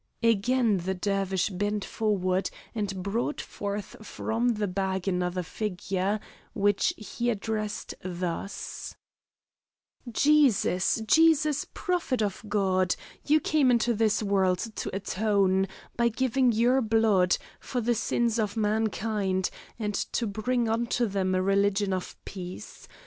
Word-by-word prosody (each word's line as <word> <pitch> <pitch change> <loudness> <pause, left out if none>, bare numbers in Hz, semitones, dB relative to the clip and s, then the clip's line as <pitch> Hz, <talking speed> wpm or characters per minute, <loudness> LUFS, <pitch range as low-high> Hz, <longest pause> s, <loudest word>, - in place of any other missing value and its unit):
Again 230 0 +3
the 190 +2 -2
Dervish 195 0 0
bent 205 +2 -1
forward 190 -4 0 0.2
and 200 -4 -3
brought 230 +9 -1
forth 200 0 -5
from 230 +3 -1
the 210 0 -1
bag 190 0 -2
another 180 -1 0
figure, 195 +1 -2 0.3
which 205 0 +2
he 235 +3 -3
addressed 215 -1 -3
thus: 180 +1 -4 1.2
"Jesus, 235 -8 +3
Jesus, 310 +2 +4
prophet 335 - 0
of 200 0 -3
God, 190 -3 +2 0.3
you 305 +1 +5
came 300 -3 +2
into 240 0 +3
this 220 0 +1
world 190 -3 +2 0.2
to - - -2
atone, 195 -1 +1 0.3
by 235 0 +3
giving 255 +1 +2
your 240 +4 +3
blood, 215 -5 +3 0.2
for 250 - -3
the 240 +1 +1
sins 235 0 0
of 210 0 -1
mankind 210 -3 0 0.3
and 210 -2 -2
to 235 - -1
bring 230 +3 0
unto 235 +2 +1
them 190 -3 0
a 185 - +1
religion 200 0 +2
of 185 -1 -4
peace. 180 -2 -8
210 Hz, 120 wpm, -28 LUFS, 190-230 Hz, 1.2 s, you